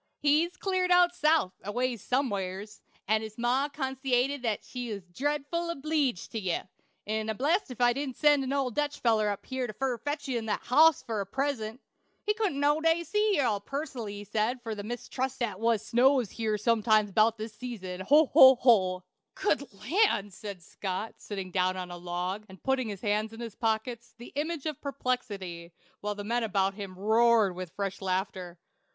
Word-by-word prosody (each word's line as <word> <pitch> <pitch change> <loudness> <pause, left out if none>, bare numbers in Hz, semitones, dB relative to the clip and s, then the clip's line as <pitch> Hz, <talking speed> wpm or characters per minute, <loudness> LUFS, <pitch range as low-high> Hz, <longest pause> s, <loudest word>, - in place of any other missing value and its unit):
"He's 315 +5 +2
cleared 370 -2 0
out 355 0 +5
South 305 - +2
aways 240 +1 -2
some'eres, 205 -5 -2 0.3
and 215 +1 +2
his 220 -1 -8
ma 250 +4 +1
consaited 265 -1 -1 0.2
she 245 -2 -6
was 200 -2 -5
dredful 290 - -2
obleeged 295 - -1
to 225 - -3
ye; 185 -4 -1 0.5
'n 220 +1 -2
I'm 220 - -2
blessed 320 +9 +1
if 250 - -8
she 240 0 +4
didn't 270 -1 -4
send 295 -2 +4
an 265 - -3
old 270 -3 0
Dutch 295 +1 -1
feller 220 -3 +2
up 205 - -4
here 260 -2 -3
fur 265 -3 0
to - - -40
fetch 290 +2 -3
ye 250 -3 0
that 220 -1 -2
hoss 310 +4 +5
fur 220 -3 -2
a - - -3
present. 255 -1 -2 0.4
He 420 - +2
couldn't 420 -10 -1
noways 295 +2 +2
wait 325 0 +4
to 340 - -5
see 420 +2 +2
ye - - +2 0.2
pus'nally, 250 -2 -5
he 205 0 -7
sed, 220 +5 -1
fur 225 -2 -3
he 205 - -5
mistrusted 245 +3 -3
the' 185 - -10
was 225 -1 +1
snows 250 -2 +3
here 220 -2 -1
sometimes 215 -1 +3
'bout 220 +3 +3
this 215 0 -6
season. 205 -7 -6
Ho! 295 +11 +5
ho! 265 0 +10
ho!" 190 -8 +3 0.3
"Good 335 -7 0
land!" 230 - +1
said 200 -3 -8
Scott, 190 +4 -4
sitting 195 -3 -6
down 185 0 +1
on 180 -1 -5
a 175 - -6
log, 180 +3 -3
and 190 -1 -14
putting 265 -3 0
his 200 -3 -6
hands 215 0 0
in 225 - -10
his 230 -3 -6
pockets, 225 +1 -2
the 240 - -11
image 305 +1 -3
of 305 -3 -4
perplexity, 200 - -4 0.3
while 210 0 -3
the 205 - -6
men 235 +3 0
about 195 -3 +1
him 195 -2 -7
roared 220 0 +4
with 180 -2 -7
fresh 200 -1 -3
laughter. 185 -2 -3
235 Hz, 190 wpm, -29 LUFS, 205-275 Hz, 0.5 s, ho